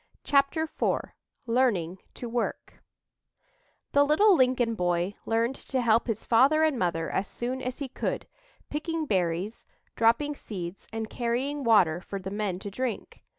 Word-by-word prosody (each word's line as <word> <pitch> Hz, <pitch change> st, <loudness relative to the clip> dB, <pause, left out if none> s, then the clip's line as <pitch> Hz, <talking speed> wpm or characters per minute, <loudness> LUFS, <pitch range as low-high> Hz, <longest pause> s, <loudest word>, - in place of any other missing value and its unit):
CHAPTER 280 Hz, +3 st, +2 dB
IV 320 Hz, -, -1 dB, 0.3 s
LEARNING 220 Hz, -8 st, +1 dB, 0.2 s
TO 245 Hz, -, -6 dB
WORK 235 Hz, +1 st, -3 dB, 1.1 s
The 285 Hz, -, +5 dB
little 370 Hz, +8 st, +5 dB
Lincoln 250 Hz, -4 st, +2 dB
boy 175 Hz, -1 st, 0 dB
learned 230 Hz, +3 st, +1 dB
to 265 Hz, -, -3 dB
help 230 Hz, -1 st, +3 dB
his 225 Hz, -2 st, -3 dB
father 275 Hz, +7 st, +5 dB
and 305 Hz, -6 st, +2 dB
mother 165 Hz, -2 st, 0 dB
as 195 Hz, -, -1 dB
soon 255 Hz, +2 st, -3 dB
as 255 Hz, 0 st, -4 dB
he 280 Hz, -, -4 dB
could, -, -, -3 dB, 0.4 s
picking 315 Hz, +1 st, -3 dB
berries, 185 Hz, -, -1 dB, 0.3 s
dropping 235 Hz, +6 st, +3 dB
seeds 190 Hz, -8 st, -7 dB
and 220 Hz, 0 st, -3 dB
carrying 255 Hz, +6 st, -2 dB
water 185 Hz, -8 st, +4 dB
for 200 Hz, -, -6 dB
the 190 Hz, 0 st, -6 dB
men 205 Hz, -3 st, -2 dB
to 200 Hz, -, -6 dB
drink. 245 Hz, +1 st, -4 dB
235 Hz, 150 wpm, -28 LUFS, 195-275 Hz, 1.1 s, The